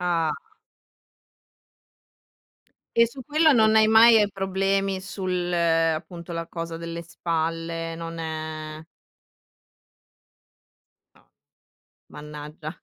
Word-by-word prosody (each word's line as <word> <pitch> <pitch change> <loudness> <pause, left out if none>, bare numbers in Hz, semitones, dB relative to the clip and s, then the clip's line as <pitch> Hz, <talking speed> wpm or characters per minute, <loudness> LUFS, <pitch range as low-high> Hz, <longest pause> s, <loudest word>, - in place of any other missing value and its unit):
Ah. 170 -3 +1 2.6
E 235 0 +6
su 260 +3 -10
quello 310 +3 +4
non 220 -2 +4
hai 220 0 +6
mai 220 -1 +7
problemi 195 0 0
sul, 185 -2 -3
appunto, 165 0 0
la 165 0 -4
cosa 165 -1 -5
delle 170 0 -6
spalle, 165 0 -3
non 165 0 -7
è 155 -1 -5 2.3
No, - - -27 0.8
mannaggia. 150 +2 -9
170 Hz, 85 wpm, -25 LUFS, 165-195 Hz, 2.6 s, mai